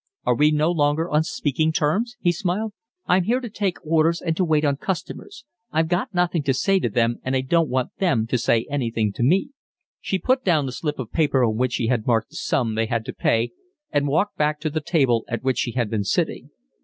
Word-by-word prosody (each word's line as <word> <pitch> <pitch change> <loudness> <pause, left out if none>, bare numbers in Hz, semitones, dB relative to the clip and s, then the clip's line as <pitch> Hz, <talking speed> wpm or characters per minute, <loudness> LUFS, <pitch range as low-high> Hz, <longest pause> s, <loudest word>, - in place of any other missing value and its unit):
"Are - - +3
we 150 +5 +4
no 155 +2 +2
longer 155 0 +1
on 150 +1 +3
speaking 155 0 0
terms?" 195 +11 0
he 175 - +2
smiled. 195 +5 -2 0.3
"I'm 180 0 +2
here 245 +5 +2
to 240 -4 -7
take 200 -4 -1
orders 165 +1 +2
and 165 -2 -2
to 185 - +1
wait 155 -3 +2
on 140 -1 +1
customers. 195 - -5 0.3
I've 160 0 +1
got 175 +3 0
nothing 175 -3 +1
to 135 -2 0
say 195 +7 +2
to 120 - -1
them, 115 +2 +1
and 130 +1 -1
I 130 - +2
don't 165 +4 +1
want 130 0 -2
them 170 - +2
to 120 +2 -1
say 115 -1 +2
anything 115 -7 -1
to - - -6
me." 185 - +2 0.5
She 190 - -1
put 255 +6 +1
down 160 - +2
the 130 - -3
slip 150 +3 -3
of 125 -4 -6
paper 145 -5 +2
on 110 -2 0
which 125 +1 0
she 120 - 0
had 115 -2 0
marked 115 -2 +1
the - - -15
sum 115 -4 0
they 110 +1 0
had 115 -1 -2
to - - -5
pay, 115 +1 +1 0.4
and 145 -1 +1
walked 180 +9 0
back 150 0 +1
to 155 -1 -2
the 155 +1 -2
table 135 -8 +2
at 120 - -4
which 130 -1 0
she 120 - -1
had 120 -4 -1
been 110 -2 0
sitting. 95 - -1
150 Hz, 235 wpm, -23 LUFS, 120-175 Hz, 0.5 s, we